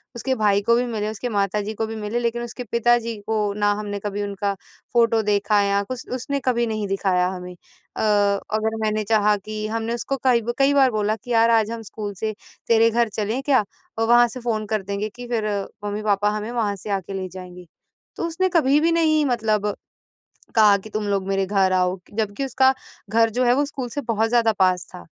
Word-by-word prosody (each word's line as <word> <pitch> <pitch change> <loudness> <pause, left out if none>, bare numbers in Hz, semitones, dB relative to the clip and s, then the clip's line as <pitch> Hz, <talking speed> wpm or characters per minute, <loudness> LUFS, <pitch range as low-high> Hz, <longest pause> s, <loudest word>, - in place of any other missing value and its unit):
उसके 260 +3 -1
भाई 205 -2 +2
को 235 +3 +3
भी 245 +1 +1
मिले, 215 -3 -2
उसके 220 +3 -4
माता 205 -1 0
जी 215 +2 -4
को 220 +1 -2
भी 225 - -6
मिले, 215 +2 -2
लेकिन 235 0 -1
उसके 240 +1 -6
पिता 240 +1 +4
जी 230 0 -5
को 220 0 0 0.2
ना 205 0 +2
हमने 205 -1 -4
कभी 205 0 -2
उनका 200 0 -2 0.4
फोटो 230 -1 +3
देखा 205 0 +2
या 200 0 +2
कुछ 250 +3 -7
उसने 270 +3 -3
कभी 240 -2 +2
नहीं 215 -2 -2
दिखाया 190 -2 +1
हमें। 180 -1 -6
अ, 175 - -12
अगर 210 +1 +1
मैंने 215 0 0
चाहा 210 0 +3
कि 215 0 -4
हमने 225 +1 -2
उसको 270 +3 -3
कई 245 -3 +4
ब 240 +2 -3
कई 275 +1 +4
बार 265 -3 +4
बोला 215 0 0
कि 235 +3 -10
यार 230 0 +4
आज 225 -1 +3
हम 230 -1 -5
स्कूल 210 -2 -5
से 215 +3 -3 0.3
तेरे 230 0 +5
घर 235 0 +1
चलें 215 +5 -2
क्या? 270 -6 +3 0.4
अ, - - +2
वहाँ 240 +1 +5
से 240 +2 -8
फोन 225 -3 -2
कर 215 - +1
देंगे 200 +2 -3
कि 245 0 -8
फिर 225 -3 -1 0.4
मम्मी-पापा 205 0 0
हमें 215 +2 -5
वहाँ 220 -4 -1
से - - -7
आके 190 +1 -8
ले 190 -1 -3
जाएँगे। 180 0 -10 0.5
तो - - -3
उसने 370 +3 0
कभी 285 -1 +4
भी 335 +1 +3
नहीं 310 -2 +3
मतलब 215 -5 0 0.8
कहा 210 -3 +6
कि 215 +3 -12
तुम 215 0 -3
लोग 195 -1 -1
मेरे 195 0 0
घर 190 -1 +2
आओ 180 0 +2
क - - -17
जबकि 215 +5 -1
उसका 265 0 +3 0.4
घर 225 0 +3
जो 250 +3 0
है 240 - +4
वो 285 - +2
स्कूल 270 -3 -5
से 285 - -4
बहुत 225 -3 0
ज़्यादा 230 -1 +3
पास 185 -2 +2
था, 180 - -9
220 Hz, 220 wpm, -22 LUFS, 205-240 Hz, 0.8 s, कहा